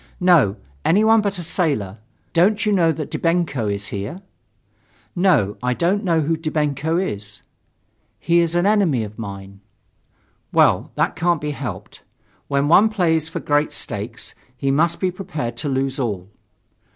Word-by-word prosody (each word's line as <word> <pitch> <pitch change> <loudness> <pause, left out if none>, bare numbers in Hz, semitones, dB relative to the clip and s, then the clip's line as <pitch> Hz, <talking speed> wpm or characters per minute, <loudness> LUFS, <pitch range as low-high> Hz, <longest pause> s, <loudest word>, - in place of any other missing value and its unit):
"No, 165 - +4 0.3
anyone 220 +4 +4
but 200 -2 -2
a 175 - -5
sailor. 140 - -1 0.3
Don't 200 +6 +3
you 210 - +2
know 170 -5 +3
that 155 -2 -5
Dybenko 165 -9 0
is 100 0 -4
here?" 105 - -5 0.9
"No, 175 - +2
I 125 0 0
don't 185 - +1
know 165 -4 +2
who 160 +2 0
Dybenko 155 0 -1
is." 105 - -4 0.7
"He 170 0 +2
is 170 0 +1
an 175 +1 +2
enemy 195 - +2
of 105 +1 -9
mine." 100 -2 -8 0.9
"Well, - - +3
that - - 0
can't 170 0 +1
be 150 0 -3
helped. 120 -10 -7 0.5
When 140 0 +1
one 195 +7 +6
plays 165 -6 +1
for - - -4
great 145 +1 +1
stakes, 110 +4 -4 0.2
he 135 +1 0
must 165 +4 +2
be 185 -1 0
prepared 160 -10 -5
to 145 +3 -2
lose 135 0 -1
all." 100 -7 -3
155 Hz, 150 wpm, -21 LUFS, 120-175 Hz, 0.9 s, one